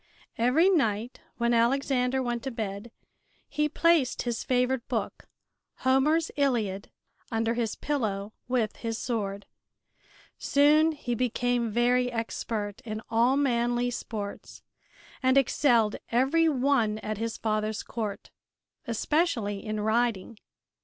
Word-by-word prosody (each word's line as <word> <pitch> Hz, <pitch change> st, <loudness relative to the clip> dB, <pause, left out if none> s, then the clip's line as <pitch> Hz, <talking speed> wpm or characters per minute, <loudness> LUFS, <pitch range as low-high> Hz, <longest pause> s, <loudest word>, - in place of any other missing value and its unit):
Every 255 Hz, +10 st, +4 dB
night 240 Hz, -, 0 dB, 0.2 s
when 235 Hz, 0 st, +1 dB
Alexander 255 Hz, +2 st, +2 dB
went 240 Hz, -1 st, -2 dB
to 270 Hz, -, -4 dB
bed 215 Hz, -2 st, -5 dB, 0.6 s
he 300 Hz, +1 st, 0 dB
placed 325 Hz, -4 st, +2 dB
his 240 Hz, -2 st, -2 dB
favorite 250 Hz, -1 st, 0 dB
book, -, -, -4 dB, 0.6 s
Homer's 300 Hz, +5 st, +3 dB
"Iliad," 225 Hz, -9 st, 0 dB, 0.4 s
under 225 Hz, 0 st, 0 dB
his 230 Hz, -2 st, -2 dB
pillow 215 Hz, -8 st, -2 dB
with 240 Hz, -4 st, 0 dB
his 225 Hz, -1 st, -3 dB
sword. 205 Hz, -5 st, -3 dB, 0.9 s
Soon 305 Hz, +3 st, +4 dB
he 255 Hz, -5 st, -4 dB
became 245 Hz, 0 st, 0 dB
very 245 Hz, +2 st, +2 dB
expert 225 Hz, -3 st, -4 dB
in 215 Hz, -1 st, -5 dB
all 240 Hz, +4 st, +3 dB
manly 240 Hz, -2 st, +1 dB
sports 210 Hz, -4 st, -6 dB, 0.6 s
and 260 Hz, 0 st, +3 dB
excelled 240 Hz, -5 st, +3 dB
every 275 Hz, +7 st, +3 dB
one 255 Hz, -6 st, +1 dB
at 215 Hz, -1 st, -3 dB
his 230 Hz, 0 st, -3 dB
father's 215 Hz, -1 st, -1 dB
court, 215 Hz, -4 st, -5 dB, 0.6 s
especially 230 Hz, -, 0 dB
in 215 Hz, -1 st, -3 dB
riding. 220 Hz, -1 st, 0 dB
240 Hz, 115 wpm, -27 LUFS, 220-265 Hz, 0.9 s, Every